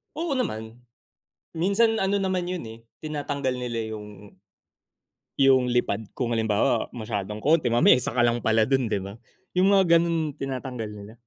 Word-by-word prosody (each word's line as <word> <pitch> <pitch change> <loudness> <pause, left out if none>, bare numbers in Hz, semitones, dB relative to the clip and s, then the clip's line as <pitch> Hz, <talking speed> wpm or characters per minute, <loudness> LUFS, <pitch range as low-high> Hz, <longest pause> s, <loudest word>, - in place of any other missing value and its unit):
Oo 320 -4 -2
naman. 110 - -3 0.8
Minsan 200 +7 +2
ano 195 +1 +1
naman 185 -2 -1
yun, 180 -6 -4
eh, 110 +1 -10 0.2
tinatanggal 145 -3 -2
nila 120 -3 -4
yung 105 -1 -11 1.1
yung 135 -2 +5
lipad 115 -3 0
kung 125 -3 -2
halimbawa 110 -2 +1
masyadong 105 -3 -4
konti, 155 -2 +3
mamaya 120 +1 +6
1 120 - -2
ka 125 - +1
lang 120 0 +2
pala 110 0 +3
dun, 135 -2 +2
'di 105 -3 -1
ba? 100 +2 -8 0.4
Yung 190 +2 +4
mga 190 -4 +5
ganun 165 -3 -1
tinatanggal 130 -4 -5
nila. 105 +1 -10
125 Hz, 155 wpm, -25 LUFS, 110-165 Hz, 1.1 s, mamaya